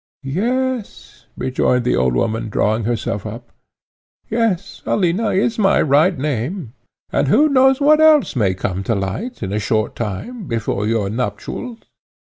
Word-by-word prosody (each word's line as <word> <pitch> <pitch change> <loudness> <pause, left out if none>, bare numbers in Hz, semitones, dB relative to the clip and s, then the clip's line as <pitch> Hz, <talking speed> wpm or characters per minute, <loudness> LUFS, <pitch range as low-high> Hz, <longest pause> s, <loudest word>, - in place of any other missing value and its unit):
"Yes," 215 - -3
rejoined 125 -1 0
the - - +2
old 60 0 +1
woman, 110 - -1
drawing 110 +1 0
herself 110 -3 -2
up 115 +3 -8 0.8
"yes, 210 -5 -1
Alina 195 +3 +1
is 220 +4 0
my 195 -2 +3
right 155 +5 +3
name, 135 - -3 0.4
and - - +1
who 265 - +5
knows 265 -2 +4
what 305 +2 +5
else 310 - +5
may 100 -6 +1
come 95 0 -3
to 115 - +1
light, 100 - -4
in 95 0 -3
a 105 - 0
short 110 +2 -1
time, 160 - -5
before 110 -3 -2
your 110 -3 0
nuptials?" 125 - -4
130 Hz, 145 wpm, -19 LUFS, -, 0.8 s, who